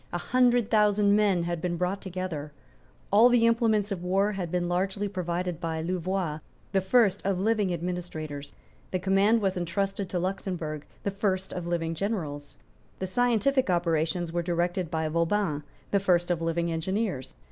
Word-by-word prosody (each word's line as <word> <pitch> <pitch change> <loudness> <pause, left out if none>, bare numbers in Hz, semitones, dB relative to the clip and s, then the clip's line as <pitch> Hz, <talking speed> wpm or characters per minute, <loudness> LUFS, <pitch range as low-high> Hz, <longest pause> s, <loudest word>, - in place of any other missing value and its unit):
A 175 - -1
hundred 245 +2 +2
thousand 210 -2 +4
men 200 -5 +3
had 170 -1 -2
been 175 -1 -1
brought 180 +3 -1
together. 180 -5 -4 0.6
All 220 +5 +7
the 240 -2 +4
implements 225 -3 +2
of 190 -3 -3
war 195 +3 +2
had 190 -4 -4
been 175 +1 -1
largely 190 +3 0
provided 180 -2 -3
by 160 -1 -2
Louvois, 180 -2 -2 0.3
the 195 - +2
first 200 0 +3
of 195 -2 0
living 210 -1 +1
administrators. 160 -5 -5 0.3
The 185 - 0
command 195 +4 +3
was 190 -2 0
entrusted 195 +2 -2
to 180 - -2
Luxemburg, 175 -5 -3 0.2
the 200 - -1
first 190 -1 -1
of 175 -1 -4
living 165 -1 -1
generals. 160 -6 -4 0.4
The 190 - -3
scientific 245 +5 +2
operations 170 0 0
were 175 - +1
directed 175 0 -1
by 160 -1 -1
Vauban, 170 0 0 0.3
the 200 - +3
first 180 -2 +2
of 170 -2 0
living 165 +1 0
engineers. 180 - -2
185 Hz, 160 wpm, -27 LUFS, 170-200 Hz, 0.6 s, All